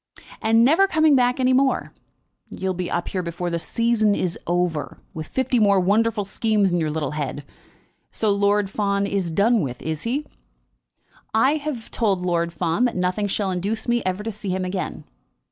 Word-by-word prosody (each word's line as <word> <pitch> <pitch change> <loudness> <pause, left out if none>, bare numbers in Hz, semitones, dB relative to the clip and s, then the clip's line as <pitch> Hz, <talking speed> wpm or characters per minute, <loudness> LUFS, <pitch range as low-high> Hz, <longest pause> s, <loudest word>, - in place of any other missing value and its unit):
"And 225 +1 +4
never 335 +9 +5
coming 315 -5 +4
back 250 0 +2
any 255 0 +3
more? 265 +1 +1 0.6
You'll 190 0 -3
be 180 0 -4
up 175 - -2
here 185 - -2
before 175 0 -4
the 170 - -1
season 220 +1 +1
is 180 -3 -1
over, 175 -3 -1
with 155 -1 -6
fifty 260 -1 0
more 200 -2 +4
wonderful 210 +3 +1
schemes 210 -1 +1
in 175 - +1
your 155 -2 0
little 150 -3 -2
head. 145 -1 -4 0.6
So 215 -2 +1
Lord 200 0 +2
Fawn 200 0 0
is 195 -3 -1
done 210 +6 +3
with, 125 -5 -4
is 155 -1 -3
he?" 265 - -2 1.1
"I 265 +7 +4
have 285 -6 -5
told 195 -5 0
Lord 170 -1 0
Fawn 170 +7 0
that 245 - -1
nothing 185 +3 0
shall 195 -1 -1
induce 200 +6 -2
me 240 0 +2
ever 185 +2 -2
to 225 - -3
see 210 -1 -6
him 185 0 -1
again." 185 0 -4
200 Hz, 180 wpm, -23 LUFS, 180-230 Hz, 1.1 s, never